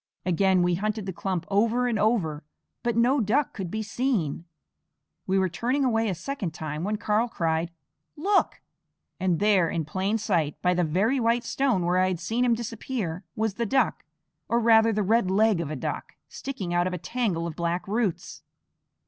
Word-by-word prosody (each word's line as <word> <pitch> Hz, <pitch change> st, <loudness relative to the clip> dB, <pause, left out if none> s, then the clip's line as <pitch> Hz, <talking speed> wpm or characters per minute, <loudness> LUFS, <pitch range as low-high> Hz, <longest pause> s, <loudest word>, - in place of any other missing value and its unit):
Again 185 Hz, 0 st, +3 dB
we 175 Hz, 0 st, +2 dB
hunted 210 Hz, +3 st, -2 dB
the 190 Hz, -, -4 dB
clump 180 Hz, -1 st, -3 dB
over 230 Hz, +5 st, +2 dB
and 230 Hz, -3 st, 0 dB
over, 190 Hz, -9 st, +1 dB, 0.4 s
but 235 Hz, -2 st, -1 dB
no 250 Hz, +4 st, +4 dB
duck 245 Hz, +7 st, +1 dB
could 190 Hz, -4 st, -5 dB
be 220 Hz, +4 st, -3 dB
seen. 215 Hz, -, -1 dB, 0.8 s
We 190 Hz, -, +2 dB
were 190 Hz, -1 st, +3 dB
turning 250 Hz, -, 0 dB
away 225 Hz, -3 st, +1 dB
a 185 Hz, -, -1 dB
second 185 Hz, -, -4 dB
time 155 Hz, 0 st, -4 dB
when 210 Hz, +2 st, -1 dB
Karl 220 Hz, +2 st, +1 dB
cried: 165 Hz, -4 st, -1 dB, 0.5 s
"Look!" 390 Hz, +6 st, +1 dB, 0.6 s
and 185 Hz, -2 st, +1 dB
there, 195 Hz, -4 st, +3 dB
in 165 Hz, -2 st, -2 dB
plain 190 Hz, +7 st, -1 dB
sight, 175 Hz, -9 st, -1 dB
by 180 Hz, 0 st, +3 dB
the 180 Hz, 0 st, +1 dB
very 200 Hz, -, +1 dB
white 235 Hz, 0 st, +2 dB
stone 245 Hz, -8 st, 0 dB
where 180 Hz, +1 st, +2 dB
I 185 Hz, -, +3 dB
had 185 Hz, -3 st, -2 dB
seen 225 Hz, +8 st, -1 dB
him 240 Hz, -2 st, +3 dB
disappear, 220 Hz, -6 st, -4 dB
was 220 Hz, -1 st, 0 dB
the 235 Hz, +3 st, -2 dB
duck, 270 Hz, -, +1 dB, 0.5 s
or 235 Hz, -, +3 dB
rather 225 Hz, -1 st, +5 dB
the 210 Hz, -1 st, 0 dB
red 220 Hz, 0 st, +2 dB
leg 205 Hz, -1 st, +3 dB
of 160 Hz, -, -4 dB
a 155 Hz, -, -3 dB
duck, 130 Hz, -, -4 dB
sticking 200 Hz, -11 st, -5 dB
out 175 Hz, +1 st, +2 dB
of 185 Hz, -, -3 dB
a -, -, -2 dB
tangle 185 Hz, -4 st, -2 dB
of 165 Hz, -2 st, -5 dB
black 170 Hz, +2 st, -2 dB
roots. 210 Hz, -3 st, -2 dB
200 Hz, 190 wpm, -26 LUFS, 175-230 Hz, 0.8 s, rather